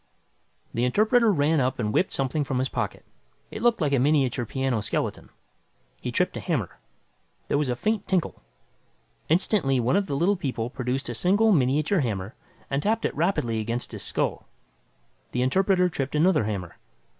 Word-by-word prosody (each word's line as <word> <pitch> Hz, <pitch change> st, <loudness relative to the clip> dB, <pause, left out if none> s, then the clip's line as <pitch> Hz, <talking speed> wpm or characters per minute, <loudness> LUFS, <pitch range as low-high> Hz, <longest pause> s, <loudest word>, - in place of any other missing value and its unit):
The 120 Hz, -, 0 dB
interpreter 215 Hz, -, +3 dB
ran 155 Hz, -2 st, +2 dB
up 130 Hz, 0 st, 0 dB
and 105 Hz, -3 st, -2 dB
whipped 185 Hz, -, +2 dB
something 135 Hz, +3 st, -1 dB
from 135 Hz, -2 st, -2 dB
his 130 Hz, +1 st, 0 dB
pocket. -, -, -4 dB, 0.5 s
It 215 Hz, -, -6 dB
looked 235 Hz, -4 st, +2 dB
like 145 Hz, -2 st, +1 dB
a 135 Hz, -, +3 dB
miniature 135 Hz, -4 st, +2 dB
piano 130 Hz, -4 st, -1 dB
skeleton. -, -, -3 dB, 0.7 s
He -, -, -3 dB
tripped -, -, 0 dB
a -, -, -3 dB
hammer. -, -, -3 dB, 0.7 s
There -, -, +2 dB
was 145 Hz, -3 st, 0 dB
a 125 Hz, -, 0 dB
faint 215 Hz, -, -1 dB
tinkle. 185 Hz, -3 st, -1 dB, 0.9 s
Instantly 160 Hz, -, +2 dB
one 120 Hz, +7 st, +1 dB
of 200 Hz, 0 st, +1 dB
the 140 Hz, -, -2 dB
Little 190 Hz, +6 st, +2 dB
People 125 Hz, -7 st, -3 dB
produced 130 Hz, +2 st, -3 dB
a 120 Hz, -, -3 dB
single 200 Hz, -, +3 dB
miniature 150 Hz, +4 st, +2 dB
hammer 105 Hz, -5 st, -2 dB, 0.3 s
and 140 Hz, +1 st, -1 dB
tapped 220 Hz, +5 st, 0 dB
it -, -, -1 dB
rapidly 145 Hz, -, 0 dB
against 115 Hz, +3 st, -3 dB
his -, -, -6 dB
skull. -, -, -2 dB, 0.9 s
The 125 Hz, -, +1 dB
interpreter 185 Hz, +6 st, +3 dB
tripped 140 Hz, -5 st, -3 dB
another 155 Hz, -, +3 dB
hammer. 95 Hz, -5 st, -4 dB
140 Hz, 170 wpm, -25 LUFS, 125-185 Hz, 0.9 s, interpreter